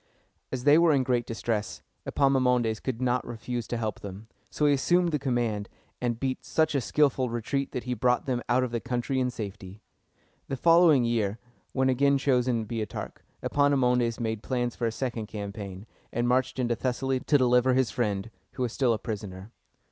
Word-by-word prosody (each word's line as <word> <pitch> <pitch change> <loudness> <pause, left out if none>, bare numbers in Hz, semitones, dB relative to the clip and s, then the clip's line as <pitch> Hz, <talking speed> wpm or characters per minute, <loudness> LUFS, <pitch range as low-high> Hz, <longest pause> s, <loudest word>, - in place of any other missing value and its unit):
As 130 -2 -3
they 145 +3 +6
were 170 -2 +5
in 135 -2 +3
great 120 -2 0
distress, 115 -2 -3 0.2
Epaminondas 125 -5 +2
could 130 -1 -3
not 125 0 +1
refuse 120 0 -5
to 120 - -2
help 110 -3 -3
them: 100 +2 -9 0.2
so 150 - 0
he 145 - +5
assumed 175 +5 +2
the 150 - 0
command, 120 -6 -1 0.3
and 120 -2 -1
beat 130 -1 -2
such 160 -1 +1
a 140 - +1
skillful 135 -1 +2
retreat 120 +4 -2
that 125 - -4
he 125 - -2
brought 125 +1 +1
them 125 -3 -1
out 125 +1 +3
of 125 - -2
the 120 - -1
country 125 +3 -2
in 125 -1 +1
safety. 100 -3 -8 0.6
The 135 - -3
following 165 -4 +5
year, 110 -3 0 0.4
when 130 -1 +2
again 140 +2 +3
chosen 125 -4 +1
Boeotarch, 110 -2 -5 0.2
Epaminondas 125 -5 +2
made 110 -2 -2
plans 120 -1 -2
for 120 - -1
a - - -1
second 115 -2 -3
campaign, 100 -2 -7 0.3
and 120 +1 0
marched 130 +1 +1
into 120 -2 0
Thessaly 130 +2 -1
to 145 +3 +3
deliver 125 0 +3
his 130 -3 +2
friend, 105 -2 -2 0.2
who 130 - -2
was 120 -2 -2
still 125 -4 +2
a - - -1
prisoner. 105 -2 -6
125 Hz, 185 wpm, -27 LUFS, 115-130 Hz, 0.6 s, they